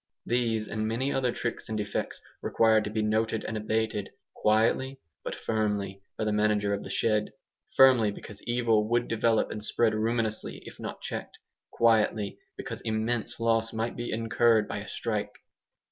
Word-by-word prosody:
These 115 -3 0
and 110 0 -2
many 125 +5 -1
other 130 -2 +1
tricks 115 -1 -4
and 110 - -2
defects 105 -1 -3 0.2
require 110 -1 +4
to 105 - -4
be 110 0 -1
noted 110 +1 0
and 115 - -3
abated, 110 -1 -1 0.2
quietly 115 +5 +2 0.2
but - - -4
firmly, 105 -3 -1 0.2
by - - -1
the 105 -1 0
manager 105 -1 +2
of 100 - -2
the - - -8
shed 105 -2 +1 0.5
firmly 130 -5 +7
because 105 0 -9
evil 115 -3 +2
would 120 0 +2
develop 115 0 +2
and 105 - -5
spread 110 +1 +2
ruinously 110 0 -1
if - - -11
not - - -6
checked; - - -5 0.3
quietly 110 -3 +2 0.2
because - - -6
immense 110 +1 -1
loss 115 0 +1
might 115 +1 -2
be 120 - -4
incurred 115 -1 +3
by - - -4
a - - -8
strike. - - -2
110 Hz, 160 wpm, -28 LUFS, 105-115 Hz, 0.5 s, firmly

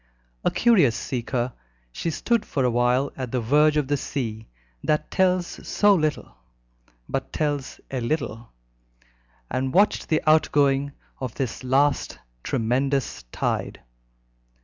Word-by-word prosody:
A - - +3
curious 185 - +4
seeker, 120 0 -2 0.4
she 165 - -3
stood 230 +7 0
for 140 -9 -2
a 125 - +2
while 125 +3 +2
at 130 -3 -5
the 125 - 0
verge 150 +6 +3
of 150 -3 +1
the 145 +1 +1
sea 115 -6 -4 0.4
that 150 0 0
tells 185 -1 +2 0.2
so 205 -1 +4
little, 155 - -1 0.7
but - - -3
tells 145 -3 -2
a 130 -2 -2
little, 120 -3 -3 1.0
and 130 +2 -1
watched 205 +3 +3
the 155 - +1
outgoing 145 -3 +3 0.3
of 130 -4 -5
this 130 -1 -3
last 135 +3 +1 0.2
tremendous 130 - 0
tide. - - -2
140 Hz, 125 wpm, -24 LUFS, 125-155 Hz, 1.0 s, curious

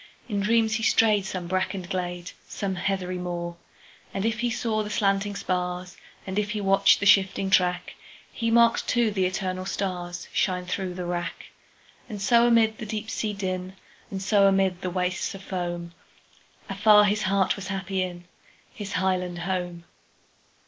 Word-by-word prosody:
In 205 -4 -2
dreams 220 +2 +2
he - - -5
strayed 215 -3 +3
some 185 -2 -4
brackened 185 0 -2
glade, 175 -1 -3 0.2
Some 195 -2 -3
heathery 185 -1 -2
moor. 175 -1 -4 0.6
And 195 - -1
if 225 -1 0
he 240 +1 +1
saw 220 -1 -1
the 210 - -4
slanting 200 0 +1
spars, 180 -1 -3 0.3
And 190 +2 -1
if 210 0 -1
he 210 0 -2
watched 195 -1 +4
the 200 - -2
shifting 195 -1 +4
track, 180 -1 +2 0.4
He 230 -1 -2
marked, 235 0 +4
too, 240 -3 +2
the 190 -2 +1
eternal 185 0 -3
starsShine 180 -1 -2
through 180 0 -3
the 180 -1 -4
wrack. 175 0 -4 0.6
And 210 -3 -6
so 235 +3 +4
amid 225 -2 +3
the - - -5
deep 215 +1 -4
sea 215 -2 -2
din, 185 -1 -4 0.3
And 190 -1 -5
so 200 0 +4
amid 190 -2 +2
the 185 - -2
wastes 180 +1 -2
of 195 - -10
foam, 175 -2 -4 0.7
Afar 210 +1 +5
his 205 +1 +1
heart 195 -1 +2
was 195 -2 -7
happy 195 0 -3
inHis 185 +3 -8
highland 180 0 0
home! 175 -1 -3
190 Hz, 160 wpm, -26 LUFS, 180-210 Hz, 0.7 s, Afar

